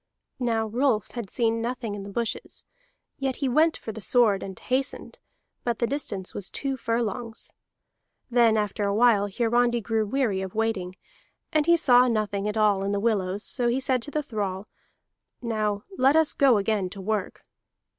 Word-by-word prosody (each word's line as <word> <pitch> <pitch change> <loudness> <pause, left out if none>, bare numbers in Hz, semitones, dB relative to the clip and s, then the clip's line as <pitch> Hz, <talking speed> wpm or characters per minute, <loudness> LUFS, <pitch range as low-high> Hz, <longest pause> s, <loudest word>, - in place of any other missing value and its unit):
Now 230 -3 0
Rolf 225 -1 0
had 235 -5 -6
seen 230 +1 0
nothing 235 -2 -3
in 205 - -5
the 200 - -8
bushes; 230 +3 -4 0.6
yet 270 -2 -1
he 275 - -2
went 310 +6 +3
for 220 - -6
the 220 0 -9
sword, 215 -4 +3
and 190 -2 -7
hastened, 265 +2 -3 0.4
but 235 -2 -1
the 235 - +1
distance 220 -8 -3
was 195 - -5
two 275 -1 -2
furlongs. 230 -1 -3 0.8
Then 235 -3 +4
after 210 0 -1
a 200 0 0
while 220 -3 +4
Hiarandi 240 +3 +1
grew 225 -1 -1
weary 220 -5 0
of 190 0 -6
waiting, 210 -5 -1 0.6
and 310 0 +2
he 340 0 +6
saw 250 -6 +5
nothing 210 -3 -1
at 210 +1 -2
all 205 -2 +3
in 200 +1 -1
the 200 - 0
willows, 200 -2 0
so 245 -3 0
he 240 +2 +1
said 260 -2 0
to 260 - -6
the 300 +1 -2
thrall: 205 -5 -4 0.7
"Now 215 -3 -2 0.2
let 270 +3 +5
us 320 -2 +3
go 265 -5 +4
again 200 -2 0
to 195 - -10
work." 205 0 -3
225 Hz, 175 wpm, -26 LUFS, 205-245 Hz, 0.8 s, he